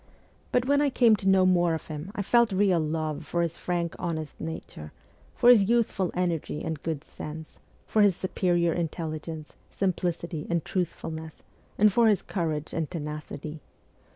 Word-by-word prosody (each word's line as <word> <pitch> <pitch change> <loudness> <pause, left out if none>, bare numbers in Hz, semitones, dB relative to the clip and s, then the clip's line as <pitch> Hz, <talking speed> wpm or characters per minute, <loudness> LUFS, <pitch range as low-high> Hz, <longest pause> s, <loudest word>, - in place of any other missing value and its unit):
But 245 0 +2
when 285 +2 +3
I 290 - +3
came 240 -4 +5
to 195 - -4
know 190 -1 +5
more 175 -2 +3
of 160 - -7
him, 155 +4 -6
I 200 - -1
felt 235 +2 +4
real 190 -2 +3
love 155 -1 -2
for 170 0 -1
his 170 -1 -2 0.4
honest, 160 -3 -3
frank - - -32
nature, 120 - -7 0.4
for - - +2
his 220 -5 +7
youthful 225 -6 +2
energy 170 -4 -1
and 160 -2 -4
good 160 -3 -3
sense, 155 +1 -9 0.3
for 215 - +2
his 200 -3 +5
superior 175 -2 +1
intelligence, 160 -2 -4 0.2
simplicity, 175 -4 -2
and 170 -2 0
truthfulness, 160 -3 -4 0.3
and 210 -1 +5
for 235 +1 +5
his 210 -3 +3
courage 160 -5 -3
and 160 -2 -2
tenacity. 150 -1 -6
170 Hz, 160 wpm, -27 LUFS, 155-195 Hz, 0.4 s, his